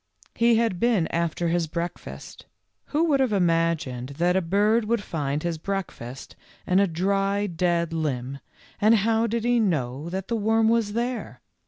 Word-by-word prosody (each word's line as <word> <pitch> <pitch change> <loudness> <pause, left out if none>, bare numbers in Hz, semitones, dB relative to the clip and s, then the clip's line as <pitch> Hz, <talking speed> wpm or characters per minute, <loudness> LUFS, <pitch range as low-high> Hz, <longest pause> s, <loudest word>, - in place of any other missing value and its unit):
He 235 0 +3
had 225 -6 +1
been 225 -7 +2
after 170 0 -1
his 170 -1 0
breakfast. 170 +2 -6 0.4
Who 305 +2 0
would 300 -5 +2
have 260 -4 +2
imagined 165 -8 0
that 175 +1 +2
a 190 - +3
bird 205 +6 +2
would 225 -1 0
find 145 -4 -3
his 170 -2 -2
break 195 +1 -3
fast 125 +3 -10 0.3
in 185 +1 +3
a 200 - +4
dry, 195 +4 0
dead 170 -2 0
limb, 140 -4 -3 0.4
and 215 +2 +5
how 225 +2 +2
did 230 0 -2
he 240 0 +3
know 150 - -1
that 190 +1 -4
the 235 - -1
worm 220 +1 +2
was 225 -3 +1
there? 240 +2 -3
190 Hz, 170 wpm, -25 LUFS, 165-225 Hz, 0.4 s, and